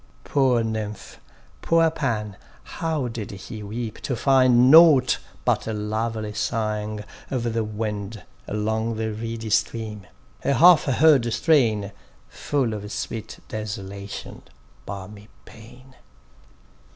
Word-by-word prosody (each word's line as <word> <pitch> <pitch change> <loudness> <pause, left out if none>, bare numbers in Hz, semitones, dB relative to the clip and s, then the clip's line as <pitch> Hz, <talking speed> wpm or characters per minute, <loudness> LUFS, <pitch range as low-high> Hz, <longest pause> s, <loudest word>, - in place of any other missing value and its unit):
Poor 130 -4 +2
Nymph,—poor 110 +9 -2
Pan,—how 130 - -4
did 115 -3 -6
he 105 +3 -8
weep 110 +2 -5
to 130 - -2
find 130 0 +4
Nought 155 -6 +7 0.3
but - - +1
a 110 - -2
lovely 110 0 -3
sighing 105 -2 -2 0.3
of 120 -3 -2
the 115 0 0
wind 105 -1 -5 0.2
Along 110 +2 -1
the 110 0 -2
reedy 115 0 -5
stream; 110 -2 -1 0.4
a 140 - +2
half 170 +6 +7
heard 135 -3 +4
strain, 110 - +2 0.4
Full 135 -6 -1
of 105 0 -6
sweet 110 0 -6
desolation—balmy 100 -1 -8 0.2
pain. 125 +4 -15
110 Hz, 105 wpm, -24 LUFS, 105-125 Hz, 0.4 s, Nought